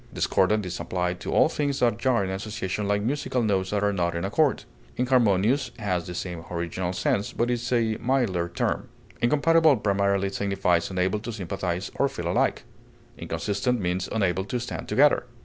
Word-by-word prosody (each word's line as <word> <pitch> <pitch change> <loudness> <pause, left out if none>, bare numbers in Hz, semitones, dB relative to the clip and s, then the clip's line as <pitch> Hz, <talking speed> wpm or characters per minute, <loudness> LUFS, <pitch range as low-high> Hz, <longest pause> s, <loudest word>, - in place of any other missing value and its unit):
Discordant 105 +2 +1
is 90 -1 -5
applied 90 -1 -2
to - - -5
all - - +5
things 145 -2 -1
that 120 -3 +2
jar 120 -4 +2
in 95 - -3
association 100 0 -3
like 100 0 +1
musical 130 0 -1
notes 95 -3 +1
that 105 -1 0
are 100 0 +2
not 85 -2 0
in 85 - -2
accord; 140 +8 +1 0.3
inharmonious 125 0 +2
has 90 -5 -2
the 90 - -6
same 85 -3 -5
original 90 +1 -3
sense, 100 +2 -1
but 120 +1 0
is 120 0 -2
a 115 -3 +1
milder 115 -9 0
term. 85 - -2 0.3
Incompatible 150 +3 +4
primarily 100 -1 +1
signifies 95 -4 0
unable 95 +2 0
to 115 +3 -6
sympathize 95 -2 -3
or 140 - +3
feel 85 -10 -3
alike; - - +1 0.5
inconsistent 120 +4 -1
means 90 -1 -2
unable 95 -4 0
to 120 +5 -3
stand 120 - -5
together. 130 +3 +3
100 Hz, 170 wpm, -26 LUFS, 90-120 Hz, 0.5 s, all